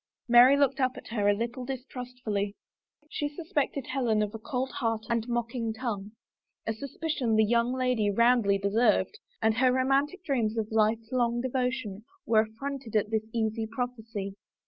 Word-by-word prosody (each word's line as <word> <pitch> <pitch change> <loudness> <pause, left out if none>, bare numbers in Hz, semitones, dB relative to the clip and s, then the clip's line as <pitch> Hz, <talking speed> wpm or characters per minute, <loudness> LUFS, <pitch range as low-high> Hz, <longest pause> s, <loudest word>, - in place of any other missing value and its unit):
Mary 245 +3 +7
looked 280 -1 +2
up 255 -1 +2
at - - -10
her 210 -3 +1
a 205 - +4
little 235 +3 -3
distrustfully. 245 -5 -4 0.5
She 295 -1 -3
sus 315 +3 -10
pected 280 -2 0
Helen 235 -5 +1
of 210 - -4
a 225 - -6
cold 260 +2 -3
heart 225 -2 -2
and 230 0 0
mocking 235 -1 -2
tongue 215 -4 -4 0.3
— - - -58
a 225 - 0
suspicion 275 -1 -2
the 220 0 +5
young 235 +2 +2
lady 250 -5 +1
roundly 235 -1 +4
deserved 200 0 +2
— - - -38
and 220 0 +3
her 255 +1 +4
romantic 275 +8 +1
dreams 235 -7 0
of 220 -1 -2
life 220 +1 +1
long 240 -2 +1
devotion 250 -5 -2 0.2
were 220 -1 +4
affronted 230 +2 -6
at 210 0 +1
this 220 0 -1
easy 220 -1 -1
prophecy. 225 -5 -4
235 Hz, 170 wpm, -28 LUFS, 220-255 Hz, 0.5 s, Mary